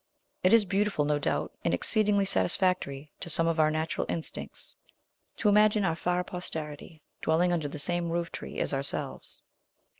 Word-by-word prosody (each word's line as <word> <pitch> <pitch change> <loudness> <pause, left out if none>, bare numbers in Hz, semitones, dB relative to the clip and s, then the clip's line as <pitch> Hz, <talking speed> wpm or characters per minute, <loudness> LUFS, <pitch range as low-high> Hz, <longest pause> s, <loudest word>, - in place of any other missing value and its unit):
It 185 - +5
is 230 -2 +6
beautiful, 195 -5 +1
no 150 0 +1
doubt, - - -1
and 85 - +2
exceedingly 205 - +3
satisfactory 145 - 0
to - - -5
some 165 +1 +1
of 165 -1 +1
our 155 0 +5
natural 155 +1 -1
instincts, 165 - -5 0.6
to 215 - +1
imagine 210 0 +5
our 165 - +1
far 180 +1 0
posterity 160 -3 -6 0.2
dwelling 175 +3 +2
under 160 -4 0
the 145 - -6
same 175 +3 0
roof 170 0 -2
tree - - -7
as - - -1
ourselves. 135 +1 -4
170 Hz, 160 wpm, -29 LUFS, 150-190 Hz, 0.6 s, is